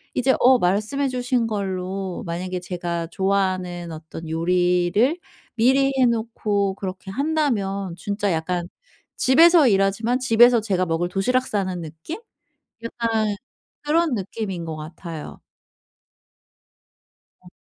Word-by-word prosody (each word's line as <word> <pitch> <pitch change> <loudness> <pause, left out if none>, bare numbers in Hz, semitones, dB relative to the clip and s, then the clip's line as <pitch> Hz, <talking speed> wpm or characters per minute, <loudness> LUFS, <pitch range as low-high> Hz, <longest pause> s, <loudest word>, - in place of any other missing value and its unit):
이제 265 +1 +3
어 255 0 +6
말씀해 215 +10 0
주신 250 -1 0
걸로 190 -2 -3
만약에 180 +2 -4
제가 175 -2 -3
좋아하는 185 -3 -1
어떤 160 +1 -9
요리를 180 - +2 0.4
미리 270 +4 +3
해 255 - +5
놓고 215 -4 -1
그렇게 190 0 -6
한다면 205 - -1
진짜 205 -1 -2
약간 175 +2 -2 0.5
집에서 320 +3 +6
일하지만 200 +4 +2
집에서 240 -1 +5
제가 190 -4 0
먹을 165 +2 -1
도시락 250 +8 +1
싸는 185 -4 -2
느낌? 160 - -8 0.6
약간 225 -3 -1 0.5
그런 315 -1 +2
느낌인 195 -3 -4
것 160 -1 -5
같아요. 160 0 -8 2.0
어. - - -16
195 Hz, 245 characters per minute, -22 LUFS, 180-240 Hz, 2.0 s, 어